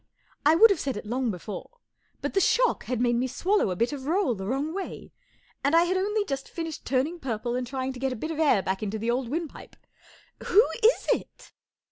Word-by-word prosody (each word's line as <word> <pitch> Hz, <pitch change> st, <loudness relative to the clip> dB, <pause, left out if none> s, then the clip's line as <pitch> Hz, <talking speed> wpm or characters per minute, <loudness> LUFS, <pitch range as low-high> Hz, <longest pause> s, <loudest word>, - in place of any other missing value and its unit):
I 310 Hz, -, +6 dB
would 445 Hz, +5 st, +8 dB
have 395 Hz, -, +1 dB
said 270 Hz, -5 st, -2 dB
it -, -, -7 dB
long 245 Hz, +3 st, -1 dB
before, 205 Hz, -, -7 dB, 0.5 s
but -, -, -2 dB
the 390 Hz, -, +3 dB
shock -, -, +2 dB
had 250 Hz, -2 st, -2 dB
made 240 Hz, -1 st, +2 dB
me 255 Hz, +2 st, 0 dB
swallow 380 Hz, -, +1 dB
a 180 Hz, -, -2 dB
bit 235 Hz, +9 st, 0 dB
of 275 Hz, -1 st, -6 dB
roll 350 Hz, -4 st, +2 dB
the 190 Hz, -3 st, -6 dB
wrong 275 Hz, +7 st, -1 dB
way, 390 Hz, 0 st, -6 dB, 0.5 s
and 280 Hz, +4 st, +3 dB
I 335 Hz, -, +6 dB
had 355 Hz, +2 st, 0 dB
only 410 Hz, +2 st, 0 dB
just 275 Hz, -5 st, -4 dB
finished 325 Hz, -2 st, -6 dB
turning 280 Hz, +6 st, 0 dB
purple 240 Hz, -3 st, -3 dB
and 250 Hz, 0 st, -2 dB
try¬ 265 Hz, -1 st, -3 dB
ing 265 Hz, -, -3 dB
to 250 Hz, -, -9 dB
get 265 Hz, 0 st, -1 dB
a -, -, -3 dB
bit 315 Hz, +8 st, -4 dB
of 320 Hz, -, -5 dB
air 265 Hz, -11 st, +4 dB
back 190 Hz, 0 st, -2 dB
into 215 Hz, 0 st, -2 dB
the 225 Hz, +2 st, -1 dB
old 245 Hz, 0 st, -1 dB
wind¬ 325 Hz, +4 st, -2 dB
pipe, -, -, -13 dB, 0.4 s
" -, -, -28 dB
W 405 Hz, -, +3 dB
h 450 Hz, -, +7 dB, 0.2 s
o -, -, +9 dB
is 480 Hz, -, +2 dB
it -, -, -19 dB
270 Hz, 250 wpm, -27 LUFS, 240-340 Hz, 0.5 s, o